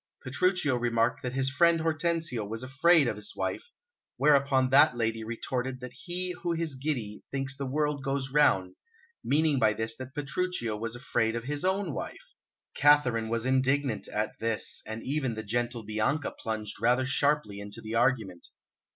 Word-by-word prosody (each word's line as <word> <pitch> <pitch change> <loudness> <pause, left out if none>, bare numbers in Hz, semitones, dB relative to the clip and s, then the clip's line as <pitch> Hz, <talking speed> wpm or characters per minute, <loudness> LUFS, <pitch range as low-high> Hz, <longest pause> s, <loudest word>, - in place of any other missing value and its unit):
Petruchio 145 0 +1
remarked 115 -1 +1
that 125 -1 -4
his 135 0 +3
friend 170 +4 +4
Hortensio 160 -6 0
was 110 +4 -5
afraid 140 +3 +4
of 105 - -2
his 105 -1 -5
wife, 480 - -3 0.5
whereupon 140 -3 +3
that 140 -2 +6
lady 115 -1 -1
retorted 125 +3 -3
that 125 0 -8
he 180 +1 -4
who 170 0 0
is 165 -3 -2
giddy 130 -7 -3
thinks 135 0 -2
the 135 0 -4
world 150 0 -1
goes 135 -1 -2
round, 95 -11 +3 0.5
meaning 150 -1 +2
by 110 -2 +4
this 110 +1 -2
that 130 +2 -9
Petruchio 145 -5 -2
was 115 +2 -4
afraid 115 -2 0
of 115 - -3
his 145 +3 -3
own 190 -3 0
wife. - - -7 0.4
Katharine 130 -6 +4
was 115 +1 -1
indignant 130 -1 +1
at 105 +1 -2
this, 115 -4 0
and 110 +1 -6
even 135 -4 -1
the 110 - -5
gentle 120 +2 -2
Bianca 110 +8 -1
plunged 110 -2 -5
rather 125 +2 +3
sharply 140 -5 +1
into 100 +2 -6
the 110 0 -7
argument. 115 -7 0
130 Hz, 165 wpm, -29 LUFS, 115-145 Hz, 0.5 s, that